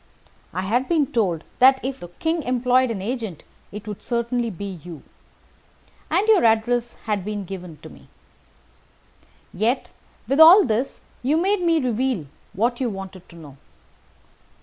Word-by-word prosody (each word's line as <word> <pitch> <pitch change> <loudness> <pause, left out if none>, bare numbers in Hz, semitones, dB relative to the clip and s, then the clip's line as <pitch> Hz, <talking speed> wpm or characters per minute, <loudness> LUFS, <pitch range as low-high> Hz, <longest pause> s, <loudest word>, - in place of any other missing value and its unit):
I 185 +2 -3
had 245 +7 0
been 320 -4 +3
told 180 -9 0 0.2
that, 265 +1 +6
if 265 0 -4
the 175 - -8
King 320 - -2
employed 255 0 +2
an 200 -5 -4
agent, 220 - -4 0.3
it 210 +1 -9
would 210 -2 -6
certainly 235 0 -1
be 195 -2 -7
you. 170 -4 -10 1.1
And 370 +7 +1
your 435 -4 +5
address 235 +1 +2
had 210 -4 -1
been 205 0 -4
given 180 -4 -8
me. - - -16 1.5
Yet, 225 +8 -1 0.4
with 275 +3 0
all 345 +6 +9
this, 240 +2 -2 0.2
you 285 +5 +1
made 385 +3 +1
me 335 -2 +3
reveal 250 - -1 0.3
what 240 +6 0
you 250 - 0
wanted 190 -2 -9
to 170 - -15
know. 145 -5 -13
235 Hz, 150 wpm, -22 LUFS, 195-265 Hz, 1.5 s, all